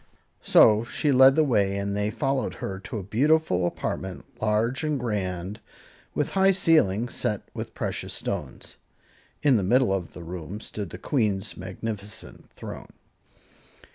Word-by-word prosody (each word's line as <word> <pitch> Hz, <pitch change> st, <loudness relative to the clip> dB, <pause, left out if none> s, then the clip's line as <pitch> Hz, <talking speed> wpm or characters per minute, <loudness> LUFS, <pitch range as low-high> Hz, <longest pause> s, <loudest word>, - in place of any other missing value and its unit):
So 110 Hz, +1 st, +6 dB
she 145 Hz, +5 st, 0 dB
led 130 Hz, +1 st, +7 dB
the 155 Hz, -, +4 dB
way 100 Hz, -8 st, +2 dB
and 100 Hz, 0 st, -2 dB
they 105 Hz, +1 st, 0 dB
followed 135 Hz, +3 st, -1 dB
her 95 Hz, -1 st, -5 dB
to 110 Hz, +4 st, -6 dB
a 100 Hz, -, -4 dB
beautiful 115 Hz, -, +2 dB
apartment, 95 Hz, +1 st, -4 dB, 0.2 s
large 110 Hz, +6 st, +1 dB
and 150 Hz, -2 st, 0 dB
grand, 100 Hz, -3 st, -3 dB, 0.6 s
with 150 Hz, -, 0 dB
high 195 Hz, 0 st, +4 dB
ceilings 120 Hz, -, +2 dB
set 105 Hz, -2 st, -1 dB
with -, -, -6 dB
precious -, -, -3 dB
stones. -, -, -5 dB, 0.7 s
In 140 Hz, -5 st, +5 dB
the -, -, +1 dB
middle 120 Hz, +2 st, +3 dB
of 95 Hz, -3 st, -3 dB
the 85 Hz, -, -9 dB
room 90 Hz, +3 st, -6 dB
stood 105 Hz, -4 st, -6 dB
the -, -, -8 dB
Queen's 105 Hz, -7 st, -1 dB
magnificent 100 Hz, +2 st, -6 dB
throne. -, -, -9 dB
105 Hz, 145 wpm, -26 LUFS, 95-130 Hz, 0.7 s, led